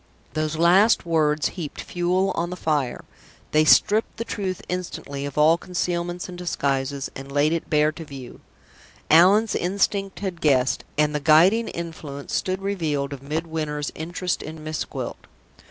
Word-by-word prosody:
Those 155 0 -1
last 180 +7 +4
words 155 -2 +2
heaped 165 -6 -7
fuel 180 +2 0
on 170 +1 -2
the 180 - -5
fire. 150 -7 -1 0.5
They 155 0 +4
stripped 215 +7 +4
the 230 - -3
truth 190 -5 -4
instantly 145 -6 -4
of 140 - -9
all 160 +3 +5
concealments 175 0 -3
and 180 - -8
disguises, 140 -5 -2
and 135 +1 -8
laid 145 +3 +2
it 165 - -3
bare 150 0 +3
to 165 +1 -9
view. 135 -5 -10 0.7
Allan's 195 +7 +6
instinct 195 +2 -1
had 185 -4 -4
guessed, 135 -3 +2
and 150 0 +2
the 150 - 0
guiding 175 +10 +5
influence 160 -4 -7
stood 185 +1 -1
revealed 155 -8 -1
of 135 - -8
Midwinter's 155 0 -3
interest 175 +2 -3
in 155 0 -8
Miss 155 0 -3
Gwilt. - - -7
160 Hz, 155 wpm, -24 LUFS, 150-180 Hz, 0.7 s, Allan's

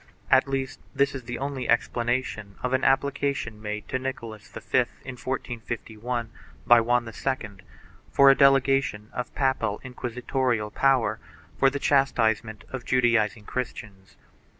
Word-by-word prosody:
At - - +5
least 135 -1 -3 0.2
this 140 0 +2
is 130 -3 -7
the 120 0 -4
only 135 -2 -4
explanation 120 -3 0
of 125 0 -1
an 130 - +1
application 135 -4 0
made 105 0 -5
to 130 - -1
Nicholas 115 -5 -6
V, - - -8 0.5
in 130 - -6
1451, 120 -2 -4 0.3
by 120 -1 +7
Juan 120 +1 +2
II, 120 0 -3 0.6
for 140 0 +7
a - - +4
delegation 135 -6 +3
of 125 -1 -5
papal 130 -6 0
inquisitorial 125 -2 -2
power 135 0 +2 0.4
for 135 - +6
the 140 - -3
chastisement 115 -6 +1
of 130 -2 -5
Judaizing 115 -4 +2
Christians. 105 -6 -6
125 Hz, 130 wpm, -26 LUFS, 110-135 Hz, 0.6 s, by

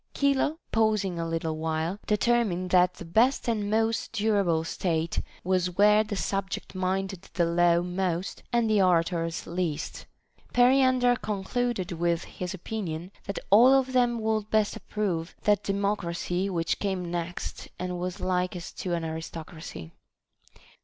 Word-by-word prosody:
Chilo, 280 +2 +2
pausing 215 -5 +1
a 165 - -2
little 165 -1 -2
while, 160 +4 -2
determined 210 -5 +1
that 180 0 +4
the - - -9
best 235 +11 +2
and 215 -3 0
most 225 +1 0
durable 200 -7 +2
state 165 -1 -1 0.2
was 180 -1 0
where 210 +1 +6
the 215 -1 -4
subject 195 -1 -3
minded 190 0 -2
the 175 - +3
law 170 0 +3
most 180 0 -2
and 235 -2 +2
the 215 -2 +3
orators 165 -2 +1
least. 170 -3 -3 0.5
Periander 250 0 +5
concluded 215 -1 -2
with 170 0 0
his 180 +1 -6
opinion, 180 -3 -5
that 200 - -4
all 245 +6 +8
of 265 -1 +1
them 245 -2 +3
would 220 -1 -1
best 215 -1 +2
approve 180 -6 -3
that 210 -1 +3
de 200 - -1
mocracy 195 -2 -1
which 165 -3 -1
came 185 -4 -2
next 175 0 -4
and 180 -1 -3
was 180 0 -4
likest 180 -1 -2
to 175 -2 -1
an 170 - -3
arisocracy. 160 - -7
185 Hz, 140 wpm, -27 LUFS, 170-215 Hz, 0.5 s, all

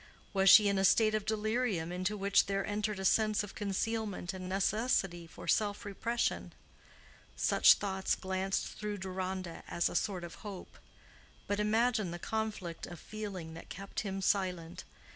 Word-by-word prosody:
Was 195 -1 +5
she 210 +2 +9
in 200 -1 +2
a - - +2
state 215 +3 +5
of 215 -1 -1
delirium 215 -5 0
into 185 +4 -2
which 200 0 +3
there 195 0 -1
entered 210 0 -2
a 190 - -4
sense 215 0 +3
of 205 - -8
concealment 205 -2 -2
and 185 -1 -6
necessity 195 -3 0
for 165 - -11
self 205 +4 +1
repression? 230 +4 -2 0.8
Such - - +6
thoughts 190 -2 -1
glanced 190 +1 -1
through 210 -1 -5
Deronda 185 -2 -4
as 170 - 0
a - - -7
sort 190 -4 -1
of 170 - -7
hope. 200 -4 -9 0.7
But 205 0 -1
imagine 220 -1 +2
the 175 - -5
conflict 205 -4 -4
of 175 -2 -9
feeling 195 -7 -6
that 165 - -11
kept 195 +2 -6
him 195 -2 -3
silent. 180 -3 -1
195 Hz, 160 wpm, -32 LUFS, 185-215 Hz, 0.8 s, she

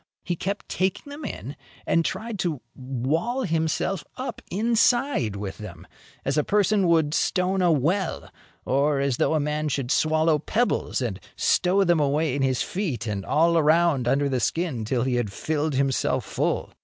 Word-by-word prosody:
He 175 - -2
kept 200 +4 -4
taking 190 +9 -2
them 290 +2 -8
in 140 - -6 0.3
and 165 - +2
tried 220 +4 -4
to 170 -7 -1 0.2
wall 140 - -2
himself 160 0 -1
up 260 +1 -5
inside 230 - +2
with 100 -1 -6
them, 90 -5 -9 0.4
as 135 +2 +1
a - - +2
person 205 0 +2
would 160 -3 +3
stone 185 +2 +1
a 175 -2 +4
well 165 +6 0 0.4
or 140 +2 +2
as 135 -3 0
though - - +2
a - - +2
man 150 +1 -1
should 135 -3 -2
swallow 155 +1 +2
pebbles 230 - 0
and 100 -6 -3 0.2
stow 185 +2 +2
them 175 -3 +3
away 145 0 +1
in 140 - -1
his 130 -2 +1
feet 155 - -3
and 100 -3 -3
all 165 +3 +3
around 155 -4 +3
under 140 +3 +2
the 130 -2 0
skin, 140 -3 -1
till 120 +2 0
he 130 -1 0
had 115 -5 -1
filled 155 +5 -2
himself 135 -1 0
full. - - -1
155 Hz, 170 wpm, -25 LUFS, 135-180 Hz, 0.4 s, a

